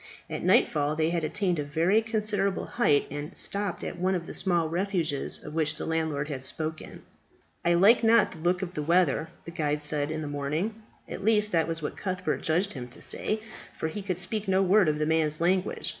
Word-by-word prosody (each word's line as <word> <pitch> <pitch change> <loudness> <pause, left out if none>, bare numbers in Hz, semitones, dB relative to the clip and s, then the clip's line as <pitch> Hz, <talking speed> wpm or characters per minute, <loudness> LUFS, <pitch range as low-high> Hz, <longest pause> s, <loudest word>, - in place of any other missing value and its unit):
At - - -4
nightfall 145 0 +2
they 160 +1 +1
had 170 -2 -1
attained 175 +1 0
a - - -1
very 165 +9 +2
considerable 210 -3 0
height, 150 -12 +2
and 145 +4 -6
stopped 200 -2 +3
at 175 - -6
one 185 +1 +1
of 170 -2 -4
the - - -8
small 175 -4 +1
refuges 170 -4 -2
of 150 - -8
which 155 -1 +1
the - - -5
landlord 160 -3 -1
had 140 -4 -5
spoken. 155 +4 -5 0.6
"I 175 0 +3
like 205 +8 +5
not 230 +1 +4
the 165 - -11
look 175 +3 0
of 180 -1 -6
the 150 - -3
weather," 165 -1 +2 0.2
the 170 - -7
guide 150 -2 -2
said 150 -1 0
in 155 0 -4
the - - -5
morning 150 +10 -3 0.3
at - - -7
least 210 0 +3
that 165 -2 +2
was 165 -1 -3
what - - -4
Cuthbert 185 -2 -3
judged 180 +6 0
him 125 -3 -7
to 125 - -15
say, 215 0 -2 0.4
for 160 - -2
he 205 +6 -5
could 190 -3 -3
speak 210 +3 -1
no 190 0 +3
word 190 -2 +4
of 150 - 0
the 150 - 0
man's 155 -1 +2
language. 180 +2 0
170 Hz, 215 wpm, -27 LUFS, 155-195 Hz, 0.6 s, like